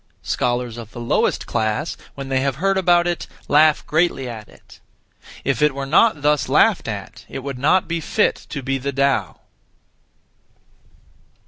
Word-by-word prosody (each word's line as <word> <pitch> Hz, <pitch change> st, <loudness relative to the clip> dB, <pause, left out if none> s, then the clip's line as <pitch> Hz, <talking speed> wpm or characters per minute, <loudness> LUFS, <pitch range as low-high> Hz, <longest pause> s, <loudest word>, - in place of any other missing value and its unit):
Scholars 120 Hz, -1 st, -1 dB
of 115 Hz, -1 st, -10 dB
the -, -, -8 dB
lowest 120 Hz, -, 0 dB
class, 110 Hz, +8 st, -1 dB, 0.2 s
when 135 Hz, -1 st, -7 dB
they 135 Hz, -1 st, +1 dB
have 135 Hz, -1 st, 0 dB
heard 195 Hz, +6 st, +1 dB
about 175 Hz, -2 st, +3 dB
it, 175 Hz, -1 st, -2 dB, 0.2 s
laugh 150 Hz, +1 st, +4 dB
greatly 155 Hz, -4 st, +1 dB
at 110 Hz, -4 st, -8 dB
it. -, -, -18 dB, 0.6 s
If 135 Hz, +2 st, -1 dB
it 150 Hz, -2 st, +3 dB
were 140 Hz, 0 st, -3 dB
not 155 Hz, +2 st, +3 dB
(thus) 150 Hz, -1 st, +2 dB
laughed -, -, +3 dB
at, -, -, -6 dB
it 135 Hz, -, -6 dB
would 135 Hz, -2 st, -5 dB
not 160 Hz, +7 st, +3 dB
be 170 Hz, 0 st, -2 dB
fit 210 Hz, +7 st, 0 dB
to 140 Hz, -3 st, -5 dB
be 135 Hz, +1 st, -1 dB
the 140 Hz, +2 st, -3 dB
Tao. 135 Hz, -9 st, 0 dB
140 Hz, 160 wpm, -21 LUFS, 125-160 Hz, 0.6 s, laugh